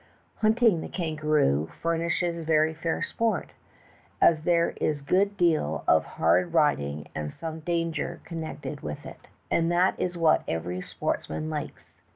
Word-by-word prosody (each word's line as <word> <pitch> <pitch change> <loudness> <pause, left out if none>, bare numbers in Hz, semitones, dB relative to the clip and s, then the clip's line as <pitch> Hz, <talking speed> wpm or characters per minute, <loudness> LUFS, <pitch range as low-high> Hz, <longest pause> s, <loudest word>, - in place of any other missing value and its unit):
Hunting 220 -5 +3
the - - -6
kan 165 -4 -3
garoo 145 - +2
furnishes 170 0 -1
very 155 0 +3
fair 160 +1 -2
sport, 230 -1 -1 0.7
as 160 -2 +4
there 170 -1 +3
is 150 -2 -1
a - - -16
good 200 +6 +2
deal 155 - +1
of - - +4
hard 165 - +2
riding 75 - +1
and 75 -1 -4
some 160 -1 -6
danger 165 0 -2
connected 155 -3 -6
with 75 - -6
it, - - -11 0.2
and 165 0 +2
that 180 +2 +3
is 180 -1 -2
what 165 -2 +4
every 90 +3 -3
sportsman 155 +10 -3
likes. 150 -2 -7
160 Hz, 150 wpm, -27 LUFS, 150-170 Hz, 0.7 s, as